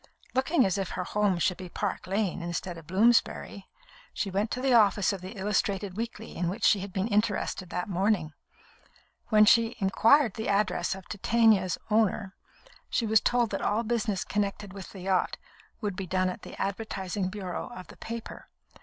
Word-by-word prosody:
Looking 265 +1 +3
as 190 +1 0
if 195 - -2
her 180 - -1
home 205 0 +1
should 175 +1 +1
be 185 -1 -8
Park 200 +1 -3
Lane 195 -2 -1
instead 170 +1 -4
of 165 -2 -12
Bloomsbury, 200 0 +2 0.5
she 195 - -2
went 200 +4 0
to 250 - -3
the 260 0 +2
office 205 -3 +4
of 195 - -6
the 190 +4 -8
illustrated 195 -1 -1
weekly 225 0 -5
in 175 0 -1
which 205 +5 -5
she 205 - +5
had 195 +1 -6
been 190 +3 -1
interested 205 -4 0
that 180 0 -3
morning. 190 -4 0 0.9
When 215 -2 +6
she 230 +1 +4
inquired 225 +5 +4
the 220 - -4
address 190 -3 +1
of 190 -1 -12
Titania's 210 -3 +3
owner, 210 -2 +1 0.6
she 235 - 0
was 220 -1 +4
told 240 -2 +2
that 195 - -2
all 215 +3 +1
business 220 -4 -1
connected 205 -1 -2
with 195 -3 -8
the 190 - -10
yacht 185 0 0 0.4
would 205 -4 -2
be 190 0 -5
done 185 +1 +1
at 180 - -6
the - - -10
advertising 195 -2 -2
bureau 185 -3 -5
of 185 -7 -9
the - - -15
paper. 230 0 -7
200 Hz, 180 wpm, -28 LUFS, 185-220 Hz, 0.9 s, When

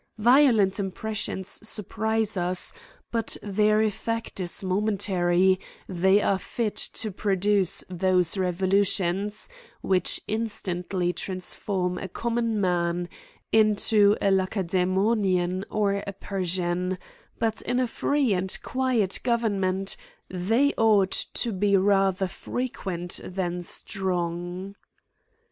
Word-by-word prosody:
Violent 230 -4 +4
impressions 200 0 -2
surprise 220 0 -1
us^ 180 -2 +1 0.4
but 230 -2 -1
their 215 +1 +2
effect 230 +1 -3
is 180 +1 0
momentary; 185 -2 +2 0.3
they 190 +2 +3
are 195 - +2
fit 225 0 -3
to 220 -2 -2
pro 200 +1 0
duce 200 -1 +2
those 180 -1 +1
revolutions 190 +2 +1 0.3
which 185 -2 +1
instantly 185 -5 -2
transform 185 -1 -2
a 190 - -5
common 230 +2 -1
man 175 -2 0 0.4
into 215 -1 +4
a 200 - +2
Lacedaemonian 185 0 +1
or 200 -2 0
a 200 - -4
Per 195 0 -4
sian; 180 +1 -1 0.4
but 225 -1 -1
in 250 - -1
a 255 - +2
free 270 0 +1
and 185 0 0
quiet 250 -7 0
government 195 -5 0 0.4
they 225 +11 +2
ought 210 -4 +4 0.2
to 235 - -1
be 200 0 +2
rather 195 -1 +2
frequent 185 -4 -4
than 180 -1 -3
strong. 180 0 -2
195 Hz, 105 wpm, -26 LUFS, 185-215 Hz, 0.4 s, Violent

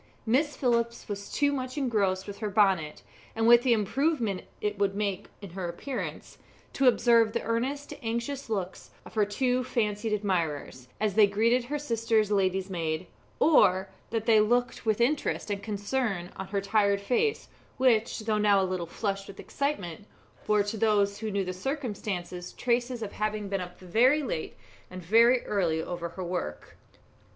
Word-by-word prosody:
Miss 280 +6 +1
Phillips 235 -2 0
was 200 -1 -6
too 285 -1 +2
much 255 0 -4
engrossed 200 -8 0
with 200 -1 -8
her 215 - -2
bonnet, 190 -7 +2 0.3
and 225 0 +1
with 240 0 +8
the 250 -1 +1
improvement 230 - 0
it 210 -1 -2
would 195 -1 +1
make 200 -1 -2 0.2
in 195 - -8
her 180 -1 -4
appearance, 250 +10 -6 0.3
to 270 - +2
observe 230 -3 +4
the - - -1
earnest, 265 +5 -2
anxious 235 +3 -3
looks 190 -4 -4 0.2
of - - -12
her 215 -2 +2
two 250 +4 0
fancied 215 -3 -1
admirers, 170 -11 -2
as 215 -2 0
they 210 0 +6
greeted 230 +5 +2
her 295 +4 -2
sister's 230 -6 0
lady'smaid; 185 -4 0 0.3
or 190 - +4 0.2
that 225 -1 -2
they 225 -2 +5
looked 240 +2 +1
with 215 0 +2
interest 250 -3 0
and 200 -1 -2
concern 205 -2 -2
on 190 - -6
her 200 0 -1
tired 200 0 +2
face, 255 - 0 0.3
which, 240 -3 +2
though 215 -1 0
now 205 -1 +4
a 190 - +2
little 185 -2 -3
flushed 195 +1 -3
with 195 - -11
excitement, 205 - -3 0.4
bore 210 -1 +3
to 205 +2 -4
those 205 -2 +2
who 220 0 -3
knew 200 -2 -1
the 185 - -3
circumstances 190 - -4
traces 240 0 -1
of 205 - -5
having 215 -1 -2
been 195 -1 -1
up 180 0 -8
very 245 - +3
late 185 - -4 0.3
and 185 0 -8
very 230 +7 +4
early 175 -6 0
over 170 +1 -4
her 185 +3 -7
work. 170 - -5
210 Hz, 165 wpm, -28 LUFS, 195-235 Hz, 0.4 s, with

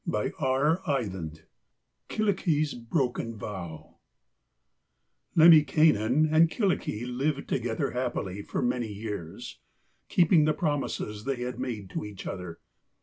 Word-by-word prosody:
KYLLIKKI'S 175 -8 +1
BROKEN 120 -1 -2
VOW 90 -7 -8 1.4
Lemminkainen 155 -5 +6
and 160 +1 +5
Kyllikki 180 - -1
lived 135 +3 -2
together 120 -3 -1
happily 120 -6 -3
for - - -3
many 120 -3 -1
years, 100 -5 -7 0.5
keeping 170 -3 +4
the 155 - +3
promises 140 -9 -2
they 135 -2 -2
had 125 0 -5
made 105 -7 -4
to - - -3
each 105 -2 -8
other. 90 -3 -6
125 Hz, 95 wpm, -28 LUFS, 105-155 Hz, 1.4 s, Lemminkainen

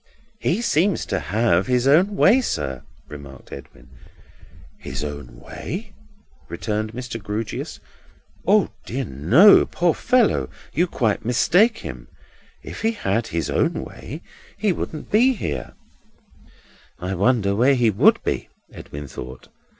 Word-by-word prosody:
"He 205 +6 0
seems 185 0 +1
to - - -2
have 95 +2 +1
his 125 0 +1
own 180 +9 +4
way, 230 +6 +5
sir," 65 - -3 0.3
remarked 70 -3 -12
Edwin. 65 -2 -12 0.9
"His 65 +3 -5
own 70 -5 -7
way?" 195 - -7 0.6
returned 110 0 -3
Mr. 125 -2 -6
Grewgious. 105 +2 -5 0.7
"O - - +4 0.2
dear 130 +6 -3
no! 110 - +6
Poor 175 -1 +1
fellow, 230 - +2 0.2
you 170 +8 +2
quite 115 -10 -1
mistake 185 - +3
him. - - -8 0.6
If - - -8
he 225 +1 +1
had 115 - -1
his 85 -3 -2
own - - +1
way, 150 +7 -9 0.3
he 205 -1 +1
wouldn't 155 -3 -5
be 245 +5 +4
here." 75 - -5 1.2
"I 90 +2 -4
wonder 100 +1 +2
where 130 +6 +4
he 120 -3 +3
would 100 - +4
be!" - - -2 0.2
Edwin 70 0 -9
thought. 65 0 -9
115 Hz, 130 wpm, -22 LUFS, -, 1.2 s, no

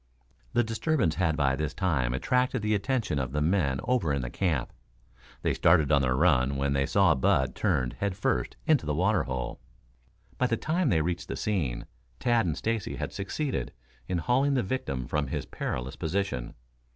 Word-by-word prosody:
The 120 - +3
disturbance 115 - 0
had 80 -2 0
by 70 -3 +2
this 75 0 -3
time 75 -11 +1
attracted 125 - +1
the 110 0 +1
attention 105 - 0
of 65 -1 -3
the 75 - 0
men 75 -4 +1
over 125 - +1
in 70 -2 -1
the - - -5
camp. 80 -10 -1 0.7
They - - +2
started 80 -3 +4
on 70 -2 +5
the 65 -2 +1
run 65 +1 +3
when 70 0 0
they 70 0 +1
saw 95 -4 +4
Bud 65 -1 +2
turned 65 -2 0
head 100 -2 -3
first 65 -10 -1
into 145 - +3
the 75 - 0
water 95 +4 +2
hole. 65 -2 -4 0.8
By 125 - +3
the 115 - 0
time 160 +3 0
they 80 -7 +3
reached 85 +1 -3
the - - -4
scene 75 - -1 0.3
Tad 120 -5 +2
and 80 - -1
Stacy 115 -3 -2
had - - -4
succeeded 135 +9 -3 0.3
in 90 - -1
hauling 130 - +2
the 125 - +2
victim 95 - -3
from 75 +1 -1
his - - -3
perilous 60 +2 -4
position. 80 -7 -2
85 Hz, 185 wpm, -28 LUFS, 70-110 Hz, 0.8 s, on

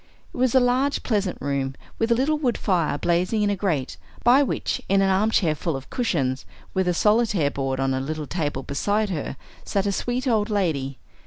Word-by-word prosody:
It - - -9
was 255 0 +2
a - - +8
large 255 +3 +1
pleasant 205 -6 0
room, 135 -1 -2 0.2
with 225 +1 +1
a - - +6
little 295 +5 +1
wood 250 -6 0
fire 170 -7 +1
blazing 180 +7 +1
in 205 - +2
a - - +1
grate, 165 -10 -2 0.3
by 250 +4 +6
which, 275 - -1
in 195 +1 +4
an 195 0 +3
arm 200 +3 +3
chair 170 -8 +2
full 160 0 -3
of 135 - -8
cushions, 140 - 0 0.3
with 190 -1 +1
a 180 - +2
Solitaire 210 -8 +2
board 135 -1 -2
on 135 0 +1
a 130 - 0
little 155 +2 -4
table 145 -4 -3
beside 205 +10 0
her, 145 -5 -4 0.3
sat 195 -1 -1
a 200 - +1
sweet 245 +6 -2
old 220 -3 +2
lady. 155 -10 -1
190 Hz, 210 wpm, -24 LUFS, 145-225 Hz, 0.3 s, a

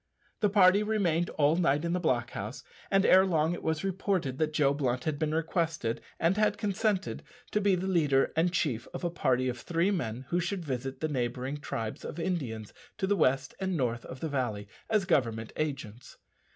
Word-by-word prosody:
The 210 - +3
party 195 0 +6
remained 180 -6 +1
all 150 +1 +2
night 150 -2 +2
in 170 - 0
the 180 - +1
block 125 -7 0
house, 105 +6 -6 0.3
and 195 -1 +3
ere 185 +1 +7
long 165 -3 +1
it - - -5
was 160 +1 -1
reported 185 -8 -1
that 155 -1 +1
Joe 145 -2 +3
Blunt 125 -3 -1
had 155 -2 -2
been 155 -1 0
requested, 160 -7 -1 0.2
and 170 +4 +2
had 210 -1 +2
consented, 205 -1 -1 0.3
to 210 - +1
be 200 -2 +4
the 180 +1 -3
leader 150 -8 +2
and 165 +2 +2
chief 130 -10 -1
of - - -5
a 175 - 0
party 130 -6 +1
of 125 -1 -3
three 170 +8 +1
men 125 - -3
who 175 - +1
should 180 0 -2
visit 135 -1 -4
the 155 - +1
neighbouring 130 0 -2
tribes 115 -6 -5
of 170 - -6
Indians 130 - -3 0.2
to 195 - 0
the 205 +1 +2
west 135 -5 +2
and 190 -2 -1
north 120 -4 -1
of 130 - -9
the 160 - -1
valley 120 -8 -2 0.2
as 215 -3 +2
Government 115 - 0
agents. 130 -6 -5
155 Hz, 200 wpm, -30 LUFS, 130-185 Hz, 0.3 s, ere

